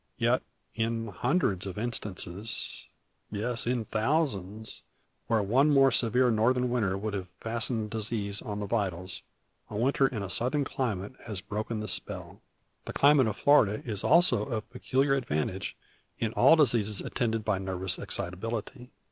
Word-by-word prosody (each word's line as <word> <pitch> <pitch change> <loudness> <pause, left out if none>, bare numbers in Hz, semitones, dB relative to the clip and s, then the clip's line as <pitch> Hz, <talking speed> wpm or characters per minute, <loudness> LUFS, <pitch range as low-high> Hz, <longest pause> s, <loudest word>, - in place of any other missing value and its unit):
Yet, - - +2 0.3
in 115 0 -2
hundreds 100 - 0
of 95 - -7
instances, 105 -3 -3 0.4
yes, 115 +3 0
in 120 -2 0
thousands, 110 - -2 0.5
where 110 -2 +2
one 130 +9 +3
more 135 -2 +5
severe 125 +1 +4
Northern 125 +3 +2
winter 105 -6 0
would 105 +1 -4
have 95 -2 -4
fastened 115 -1 -1
disease 105 -2 -2
on 105 -1 -5
the 105 - -3
vitals, 95 -4 -3 0.5
a 105 - -5
winter 135 +4 +2
in 110 -6 -4
a - - -4
Southern 130 +8 +1
climate 110 -6 -3
has 105 -4 -4
broken 105 +3 -4
the 110 - -5
spell. 90 - -1 0.4
The - - -6
climate 140 -3 +5
of 105 - -3
Florida 110 -8 +3
is 105 -5 0
also 175 +3 +4
of 115 -5 -4
peculiar 135 +2 0
advantage 95 - -2 0.4
in 110 -1 -2
all 135 +6 +6
diseases 115 - +3
attended 115 -3 -2
by 105 -3 0
nervous 95 -1 -1
excitability. 115 +7 -4
110 Hz, 150 wpm, -28 LUFS, 100-125 Hz, 0.5 s, all